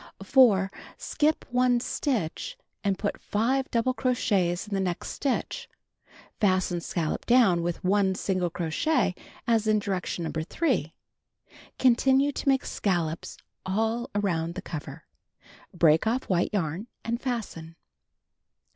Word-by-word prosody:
4. 195 Hz, -4 st, +5 dB, 0.3 s
Skip 310 Hz, +1 st, 0 dB
1 250 Hz, 0 st, +3 dB
stitch 250 Hz, -, -2 dB, 0.3 s
and 200 Hz, -2 st, +1 dB
put 205 Hz, -, -3 dB
5 255 Hz, +6 st, 0 dB
double 240 Hz, +1 st, +1 dB
crochets 205 Hz, -8 st, 0 dB
in 210 Hz, -, -6 dB
the 195 Hz, -, +1 dB
next 180 Hz, -2 st, -2 dB
stitch. 385 Hz, -, -2 dB, 0.7 s
Fasten 185 Hz, -4 st, +1 dB
scallop 165 Hz, -2 st, -3 dB
down 230 Hz, -8 st, +5 dB
with 170 Hz, 0 st, -3 dB
1 190 Hz, 0 st, +2 dB
single 185 Hz, -2 st, -1 dB
crochet 175 Hz, -, 0 dB, 0.3 s
as 225 Hz, -2 st, +2 dB
in 215 Hz, 0 st, +4 dB
direction 190 Hz, -4 st, -2 dB
No. 160 Hz, -, -3 dB
3. 175 Hz, -, -1 dB, 0.8 s
Continue 265 Hz, +3 st, +4 dB
to 280 Hz, -, -1 dB
make 270 Hz, -1 st, +2 dB
scallops 170 Hz, -5 st, -2 dB, 0.3 s
all 225 Hz, +6 st, -1 dB
around 170 Hz, -5 st, 0 dB
the -, -, -6 dB
cover. 150 Hz, -1 st, -7 dB, 0.7 s
Break 165 Hz, +3 st, +4 dB
oft" 245 Hz, +4 st, 0 dB
white 175 Hz, -1 st, +2 dB
yarn 185 Hz, +1 st, -2 dB, 0.2 s
and 235 Hz, +2 st, -2 dB
fasten. 195 Hz, -10 st, -4 dB
205 Hz, 125 wpm, -27 LUFS, 175-245 Hz, 0.8 s, 4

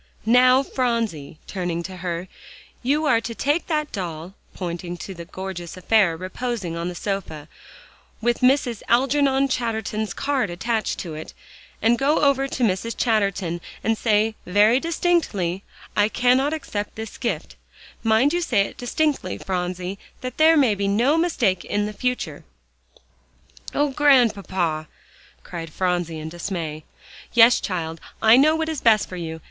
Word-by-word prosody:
"Now, 255 Hz, +3 st, +5 dB
Phronsie," 230 Hz, -, -2 dB
turning 175 Hz, -3 st, -3 dB
to 185 Hz, +1 st, -7 dB
her, 175 Hz, 0 st, -4 dB, 0.5 s
"you 290 Hz, +5 st, +1 dB
are 240 Hz, -6 st, +3 dB
to 230 Hz, 0 st, -6 dB
take 290 Hz, +7 st, 0 dB
that 305 Hz, -2 st, -1 dB
doll," 175 Hz, -2 st, -5 dB, 0.2 s
pointing 175 Hz, -1 st, -5 dB
to 195 Hz, -, -7 dB
a 170 Hz, -, -6 dB
gorgeous 185 Hz, -1 st, -7 dB
affair 185 Hz, -3 st, +3 dB
reposing 185 Hz, 0 st, -4 dB
on 170 Hz, +1 st, -3 dB
the 180 Hz, -, -7 dB
sofa, 170 Hz, -6 st, -4 dB, 0.7 s
with 240 Hz, +1 st, 0 dB
Mrs. 250 Hz, -3 st, +2 dB
Algernon 270 Hz, +2 st, +3 dB
Chatterton's 220 Hz, -4 st, -2 dB
card 275 Hz, -7 st, 0 dB
attached 220 Hz, +5 st, -2 dB
to 170 Hz, -4 st, -6 dB
it, 155 Hz, +1 st, -8 dB, 0.5 s
"and 235 Hz, +2 st, +4 dB
go 280 Hz, +3 st, +2 dB
over 275 Hz, -2 st, +3 dB
to 255 Hz, -, -3 dB
Mrs. 225 Hz, +2 st, 0 dB
Chatterton, 195 Hz, -7 st, 0 dB, 0.2 s
and 225 Hz, -, +2 dB
say, 215 Hz, 0 st, +2 dB
very 210 Hz, +6 st, +4 dB
distinctly, 295 Hz, -, 0 dB, 0.3 s
'I 205 Hz, +1 st, +3 dB
cannot 255 Hz, +5 st, +3 dB
accept 210 Hz, -10 st, -4 dB
this 220 Hz, -1 st, -7 dB
gift;' 170 Hz, -, -3 dB, 0.5 s
mind 225 Hz, +6 st, +3 dB
you 350 Hz, -, +1 dB
say 235 Hz, -11 st, +2 dB
it 195 Hz, -, -3 dB
distinctly, 295 Hz, +4 st, -1 dB
Phronsie, 180 Hz, +1 st, -3 dB, 0.2 s
that 255 Hz, -1 st, -6 dB
there 320 Hz, +1 st, +6 dB
may 260 Hz, -7 st, +4 dB
be 200 Hz, 0 st, -1 dB
no 235 Hz, +9 st, +3 dB
mistake 250 Hz, -, +1 dB
in 205 Hz, 0 st, -1 dB
the 210 Hz, -, -4 dB
future." 250 Hz, +4 st, -3 dB, 1.3 s
"Oh, 290 Hz, 0 st, +2 dB
Grandpapa!" 200 Hz, -, +2 dB, 0.6 s
cried 165 Hz, -2 st, -7 dB
Phronsie 175 Hz, -2 st, -1 dB
in 155 Hz, 0 st, -6 dB
dismay. 165 Hz, -3 st, -5 dB, 0.5 s
"Yes, 235 Hz, +1 st, +7 dB
child; 165 Hz, -4 st, -4 dB, 0.2 s
I 220 Hz, +1 st, +7 dB
know 300 Hz, +5 st, +5 dB
what 320 Hz, 0 st, -1 dB
is 315 Hz, -4 st, -3 dB
best 220 Hz, -3 st, +4 dB
for 185 Hz, -, -8 dB
you. 160 Hz, -2 st, -5 dB
215 Hz, 150 wpm, -23 LUFS, 180-255 Hz, 1.3 s, Yes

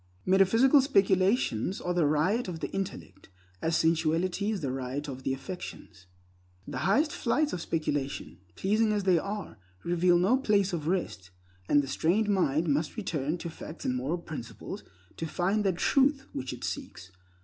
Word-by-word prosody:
Metaphysical 225 Hz, +9 st, +5 dB
speculations 195 Hz, -, +2 dB
are 180 Hz, -, -2 dB
the 170 Hz, -4 st, +3 dB
riot 185 Hz, +11 st, +1 dB
of 170 Hz, -3 st, -5 dB
the -, -, -4 dB
intellect, 175 Hz, -, -6 dB, 0.3 s
as 165 Hz, 0 st, +1 dB
sensuality 165 Hz, +5 st, +1 dB
is 210 Hz, -4 st, -2 dB
the 135 Hz, -3 st, -2 dB
riot 135 Hz, +3 st, -4 dB
of 130 Hz, -2 st, -6 dB
the 130 Hz, -, -1 dB
affections. 135 Hz, -, -7 dB, 0.6 s
The -, -, -4 dB
highest 290 Hz, -, +2 dB
flights 295 Hz, +5 st, 0 dB
of 175 Hz, -, -3 dB
speculation—pleasing 155 Hz, -, -1 dB
as 205 Hz, -1 st, 0 dB
they 185 Hz, -3 st, +4 dB
are—reveal 175 Hz, -, -1 dB
no 195 Hz, +9 st, +3 dB
place 205 Hz, -7 st, +2 dB
of 155 Hz, -3 st, -3 dB
rest, 165 Hz, -, -2 dB, 0.4 s
and 145 Hz, -1 st, +5 dB
the -, -, -5 dB
strained 185 Hz, +10 st, +1 dB
mind 170 Hz, -5 st, +2 dB
must 150 Hz, +7 st, 0 dB
return 160 Hz, -6 st, -2 dB
to 170 Hz, -, -6 dB
facts 160 Hz, +1 st, -9 dB
and 125 Hz, -, 0 dB
moral 135 Hz, +7 st, -1 dB
principles 155 Hz, -8 st, -7 dB, 0.3 s
to 165 Hz, -, -3 dB
find 190 Hz, +7 st, 0 dB
that 185 Hz, -3 st, +1 dB
truth 275 Hz, +5 st, +2 dB
which 130 Hz, 0 st, -4 dB
it -, -, -8 dB
seeks. 90 Hz, +3 st, -6 dB
175 Hz, 160 wpm, -29 LUFS, 145-200 Hz, 0.6 s, Metaphysical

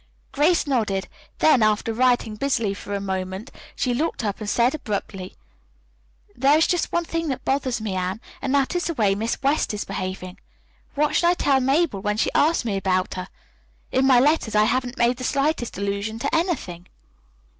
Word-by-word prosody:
Grace 320 Hz, +5 st, +2 dB
nodded. 215 Hz, -9 st, 0 dB, 0.3 s
Then, 280 Hz, -6 st, +4 dB
after 215 Hz, +1 st, +2 dB
writing 245 Hz, -2 st, +2 dB
busily 230 Hz, -4 st, 0 dB
for 200 Hz, 0 st, -6 dB
a -, -, -1 dB
moment, 190 Hz, +3 st, -4 dB, 0.2 s
she 250 Hz, -, 0 dB
looked 300 Hz, +1 st, -1 dB
up 200 Hz, -2 st, -2 dB
and 210 Hz, -2 st, -4 dB
said 240 Hz, +3 st, +2 dB
abruptly: 200 Hz, -8 st, -5 dB, 1.0 s
"There 275 Hz, +4 st, +4 dB
is 320 Hz, -, +4 dB
just 355 Hz, -, 0 dB
one 345 Hz, 0 st, 0 dB
thing 330 Hz, 0 st, -2 dB
that 265 Hz, -3 st, -4 dB
bothers 265 Hz, -3 st, 0 dB
me, 215 Hz, -3 st, -3 dB
Anne, 185 Hz, +2 st, -2 dB, 0.2 s
and 265 Hz, -, -2 dB
that 275 Hz, +5 st, +1 dB
is 355 Hz, -, 0 dB
the 335 Hz, -, -2 dB
way 205 Hz, -5 st, +2 dB
Miss 220 Hz, +3 st, -2 dB
West 275 Hz, -5 st, +1 dB
is 205 Hz, -, -4 dB
behaving. 185 Hz, -1 st, -5 dB, 0.6 s
What 300 Hz, +1 st, +1 dB
shall 345 Hz, -, +4 dB
I -, -, +4 dB
tell 275 Hz, -5 st, +2 dB
Mabel 270 Hz, -, +1 dB
when 210 Hz, +1 st, -1 dB
she -, -, +1 dB
asks 315 Hz, -3 st, +2 dB
me 205 Hz, -4 st, -1 dB
about 185 Hz, -1 st, 0 dB
her? 185 Hz, -1 st, -5 dB, 0.6 s
In 265 Hz, +1 st, +2 dB
my 255 Hz, -2 st, +6 dB
letters 275 Hz, -5 st, +2 dB
I 210 Hz, -, +5 dB
haven't 250 Hz, +3 st, 0 dB
made 240 Hz, 0 st, +2 dB
the 255 Hz, -, -7 dB
slightest 275 Hz, -3 st, 0 dB
allusion 200 Hz, +2 st, -2 dB
to 235 Hz, -, -1 dB
anything." 265 Hz, -, -2 dB
240 Hz, 190 wpm, -23 LUFS, 200-280 Hz, 1.0 s, my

